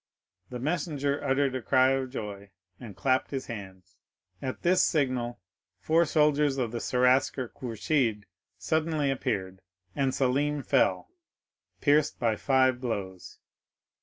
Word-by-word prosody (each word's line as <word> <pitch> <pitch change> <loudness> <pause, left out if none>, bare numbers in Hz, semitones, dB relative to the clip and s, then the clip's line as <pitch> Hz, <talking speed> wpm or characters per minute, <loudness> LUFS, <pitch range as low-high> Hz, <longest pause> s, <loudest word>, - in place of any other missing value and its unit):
The 125 - -5
messenger 145 0 -2
uttered 135 0 +1
a 130 - -3
cry 130 +2 +3
of 135 -1 -1
joy 100 -5 -7 0.3
and 110 -6 -10
clapped 130 -1 +1
his 135 -2 -4
hands. 95 -5 -9 0.4
At 130 -1 -5
this 180 +2 +4
signal 130 -6 0 0.4
four 165 +7 +3
soldiers 150 -2 +2
of 120 -4 -1
the 120 - -3
Seraskier 125 0 +1
Kourchid 115 -2 -1 0.3
suddenly 155 -3 0
appeared, 95 -7 -3 0.3
and 135 -1 +1
Selim 140 +3 0
fell, - - +1 0.7
pierced 145 0 +3
by 115 -2 +1
five 130 +1 +2
blows. 100 -7 -5
130 Hz, 125 wpm, -28 LUFS, 120-145 Hz, 0.7 s, this